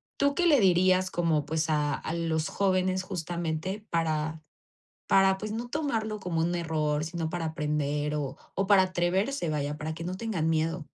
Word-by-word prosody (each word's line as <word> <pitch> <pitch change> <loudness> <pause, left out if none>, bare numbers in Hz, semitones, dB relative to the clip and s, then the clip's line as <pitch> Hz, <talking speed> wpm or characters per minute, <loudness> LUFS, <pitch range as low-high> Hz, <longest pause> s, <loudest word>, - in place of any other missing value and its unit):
¿tú 280 0 +2
qué 350 +4 +1
le 290 -6 +6
dirías 185 0 +4
como, 160 -4 +1
pues, 160 +1 -1
a 150 -1 +1
a 160 - -4
los 165 -2 -1
jóvenes? 185 -1 +1
Justamente 175 +2 -3
para, 160 -1 -1 0.7
para 195 0 +5
pues, 210 +1 -5
no 235 +2 -4
tomarlo 225 -8 -2
como 175 -4 -1
un 175 +2 0
error, 155 -3 0
sino 165 0 -3
para 170 -1 -3
aprender 150 -1 -1
o 140 -1 -3 0.2
o 195 - +1
para 200 -1 +6
atreverse, 185 - 0
vaya, 150 -1 -2
para 155 +1 -4
que 160 +1 -7
no 180 +2 -3
tengan 190 -8 -1
miedo. 165 0 0
170 Hz, 175 wpm, -28 LUFS, 155-190 Hz, 0.7 s, le